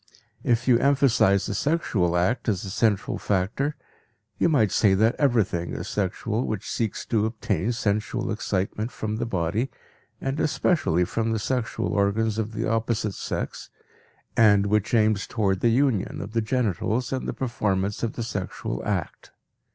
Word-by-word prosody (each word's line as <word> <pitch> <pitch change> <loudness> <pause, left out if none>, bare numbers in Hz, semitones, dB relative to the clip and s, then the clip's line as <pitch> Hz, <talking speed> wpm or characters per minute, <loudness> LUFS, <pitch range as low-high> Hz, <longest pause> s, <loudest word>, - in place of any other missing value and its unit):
If 120 +1 +1
you 120 -2 +5
emphasize 130 -8 +3
the 105 - -3
sexual 100 - +1
act 110 +8 +1
as 100 -4 -1
the 95 - -5
central 105 -1 +1
factor, 105 +10 0 0.6
you - - +3
might 110 - +3
say 100 -3 +4
that 110 +4 +3
everything 110 - +1
is - - -5
sexual 110 +4 -1
which 105 -1 -3
seeks 110 -3 -2
to 110 -2 +1
obtain 110 +1 -1
sensual 110 +1 -1
excitement 105 +2 -2
from 110 0 -3
the 120 +1 -2
body 100 +6 -1 0.5
and 135 +3 -2
especially 150 - +2
from 115 +4 -1
the - - 0
sexual 115 +1 -2
organs 105 +2 +1
of 110 0 -3
the - - -2
opposite 115 -2 0
sex, - - -4 0.7
and 105 -3 +5
which 105 +2 +1
aims 110 -2 +2
toward 100 -4 0
the 120 - +3
union 120 -4 +1
of 100 - -6
the 115 - +2
genitals 110 +1 -1
and 130 - -3
the - - -1
performance 100 -5 -1
of 115 - -1
the 120 - -4
sexual 95 - -4
act. - - -3
110 Hz, 160 wpm, -25 LUFS, 100-120 Hz, 0.7 s, you